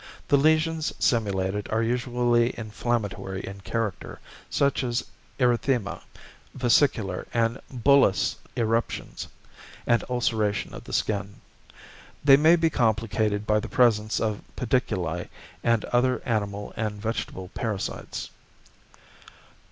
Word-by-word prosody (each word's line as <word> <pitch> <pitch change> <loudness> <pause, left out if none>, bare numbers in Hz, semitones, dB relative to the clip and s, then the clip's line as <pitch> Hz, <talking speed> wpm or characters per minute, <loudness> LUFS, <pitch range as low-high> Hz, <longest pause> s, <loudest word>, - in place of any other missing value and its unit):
The - - +5
lesions 155 +2 +2
simulated 100 -4 0
are 110 +1 +1
usually 120 0 +1
inflammatory 105 -4 -3
in 100 +1 -8
character, 110 -2 -3 0.3
such 140 -1 +1
as 120 0 -1 0.3
erythema, 125 -3 +1 0.5
vesicular 120 -7 +2
and 115 +2 +1
bullous 130 -5 +3 0.2
eruptions, 115 0 -1 0.6
and 120 - +3
ulceration 110 -4 0
of - - -9
the - - -9
skin. 100 -1 -1 0.8
They 140 -1 +8
may 155 +4 +6
be 165 -1 +2
complicated 110 -3 +1
by 105 -1 +3
the - - -6
presence 110 -3 +3
of 110 -2 -1
pediculi 95 -9 -1 0.3
and 115 -2 +2
other 125 +1 +1
animal 105 -3 -2
and 105 -2 -3
vegetable 110 -4 -4
parasites. 105 -2 -4
115 Hz, 105 wpm, -26 LUFS, 105-125 Hz, 0.8 s, They